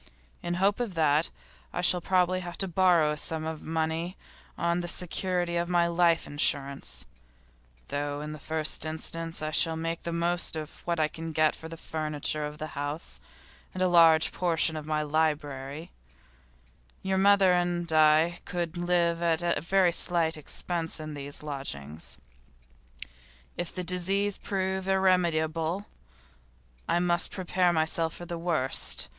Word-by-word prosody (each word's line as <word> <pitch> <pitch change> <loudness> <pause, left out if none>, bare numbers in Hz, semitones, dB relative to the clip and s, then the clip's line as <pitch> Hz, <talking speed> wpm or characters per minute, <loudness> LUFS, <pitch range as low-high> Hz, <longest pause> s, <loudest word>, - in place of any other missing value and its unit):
In 175 0 -2
hope 195 +4 +2
of 230 -7 -3
that 155 0 +3 0.4
I - - -3
shall 180 0 +4
probably 185 0 +2
have 175 -1 -7
to 195 - 0
borrow 175 -4 +3
a 150 - -3
sum 160 +1 -2
of 160 -1 -5
money 160 +2 -2 0.4
on 170 +1 0
the 175 - -4
security 175 0 0
of 170 0 -1
my 175 -1 +3
life 170 -1 +2
insurance, 140 - -1 0.8
though 145 0 -2
in 150 +1 -6
the 155 - -8
first 155 +1 -1
instance 165 +1 -4
I 155 - -2
shall 165 +1 +2
make 165 +1 -3
the 170 - -4
most 170 0 0
of 155 -1 -7
what 170 -1 -1
I 155 - +3
can 165 +1 -7
get 155 0 +3
for 160 - -10
the 165 - -8
furniture 155 -1 -1
of 150 0 -9
the 155 - -5
house 145 +3 -5 0.5
and 185 - 0
a - - +4
large 165 -2 +5
part 170 -3 +1
of 155 -1 -7
my 155 -1 0
library; 150 -1 -2 1.1
your 190 0 0
mother 195 -1 +5
and 175 -1 0
I 155 +2 +4
could 175 -1 -4
live 175 -1 +1
at 170 -1 +1
very 185 0 +3
slight 170 -2 +4
expense 165 +2 -3
in 155 0 -6 0.3
lodgings. 80 - -6 1.4
If 175 - -5
the 180 - -3
disease 190 +3 +1
prove 190 -1 -2
irremediable, 175 -2 +1 1.0
I - - +2
must 175 -1 +2
prepare 180 -1 +1
myself 160 0 +1
for 175 - -8
the 170 -1 -5
worst. 160 -6 +1
165 Hz, 150 wpm, -28 LUFS, 155-175 Hz, 1.4 s, large